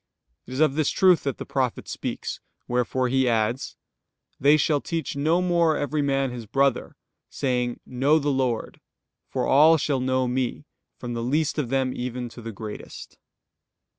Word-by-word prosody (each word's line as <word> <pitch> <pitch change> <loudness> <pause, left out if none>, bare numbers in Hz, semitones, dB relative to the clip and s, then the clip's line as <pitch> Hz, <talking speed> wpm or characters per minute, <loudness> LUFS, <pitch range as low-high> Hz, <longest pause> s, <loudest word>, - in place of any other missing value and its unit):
It 125 - -8
is 130 - -4
of 155 -3 +4
this 155 0 +1
truth 185 -3 +4
that 140 - -1
the - - -6
prophet 130 -4 -2
speaks; - - -5 0.3
wherefore 125 +1 0
he 130 0 +2
adds: 115 +2 -1 0.6
"They 145 +3 +5
shall 150 -1 +1
teach 165 -4 -3
no 160 +5 +2
more 170 -3 +2
every 145 +1 -1
man 135 -2 0
his 120 -3 -7
brother, 135 +2 +1 0.3
saying: 125 -3 -1
'Know 135 +5 +2
the 145 -2 0
Lord': 130 -4 -2 0.5
for - - -1
all 155 +4 +6
shall 140 -2 0
know 130 0 +1
Me, 125 +3 -2 0.3
from 120 -1 -6
the 115 - -3
least 150 +6 0
of 130 -6 -2
them 130 -1 0
even 125 0 -4
to 120 - -11
the 115 0 -6
greatest." 105 0 -9
135 Hz, 165 wpm, -25 LUFS, 125-145 Hz, 0.6 s, all